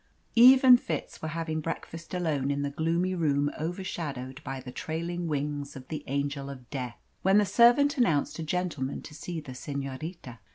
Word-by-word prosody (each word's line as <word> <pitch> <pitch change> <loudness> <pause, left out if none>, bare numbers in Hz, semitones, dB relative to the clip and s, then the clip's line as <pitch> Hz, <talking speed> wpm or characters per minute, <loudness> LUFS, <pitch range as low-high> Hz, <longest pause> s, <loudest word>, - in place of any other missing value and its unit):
Eve 255 +3 +8
and 250 -2 +8
Fitz - - -4
were 160 - -3
having 160 0 -2
breakfast 165 +1 -6
alone 150 -6 0
in 140 0 0
the 140 - -2
gloomy 165 +5 0
room 145 -4 +1
overshadowed 150 -6 -4
by 135 -1 -4
the 130 -1 -8
trailing 170 +4 -3
wings 145 -1 -3
of 130 -1 -10
the 155 - -4
Angel 140 0 -2
of 130 -3 -9
Death, 125 -4 -4 0.2
when 195 +2 +4
the 210 - +5
servant 245 +8 +5
announced 165 - +2
a - - -2
gentleman 155 -5 -2
to 150 - -10
see 165 +2 -5
the 140 -4 -9
senorita. 135 0 -6
155 Hz, 175 wpm, -28 LUFS, 140-175 Hz, 0.2 s, Eve